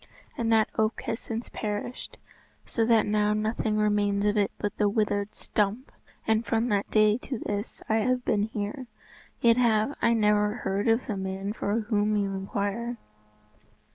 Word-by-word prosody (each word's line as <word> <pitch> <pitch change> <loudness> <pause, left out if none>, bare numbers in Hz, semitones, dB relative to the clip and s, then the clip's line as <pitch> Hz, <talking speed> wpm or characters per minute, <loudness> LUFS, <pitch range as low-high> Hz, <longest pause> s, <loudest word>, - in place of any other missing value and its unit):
And 230 -5 -1
that 220 -1 +4
oak 220 0 +1
has 225 - -3
since 230 +1 -5
perished, 210 +3 -5 0.5
so 225 - 0
that 225 -2 +4
now 210 0 +2
nothing 215 0 -1
remains 205 -1 +1
of 210 +1 +2
it 205 -2 +2
but 205 - -3
the 210 -1 +3
withered 205 -1 -1
stump; 210 +5 -1 0.3
and 220 0 +2
from 225 +2 0
that 205 -1 0
day 215 +1 +4
to 255 0 -5
this 205 0 -4
I 220 - +2
have 250 +3 0
been 205 - +2
here, 220 +4 -5 0.5
yet 230 0 +5
have 230 +2 +2
I 235 - +4
never 210 -1 +2
heard 195 -2 -2
of 225 +2 +3
the 215 -6 -3
man 190 +1 -3
for 215 +1 -1
whom 210 -1 +1
you 200 -1 0
inquire. 200 +5 -3
215 Hz, 170 wpm, -27 LUFS, 205-225 Hz, 0.5 s, yet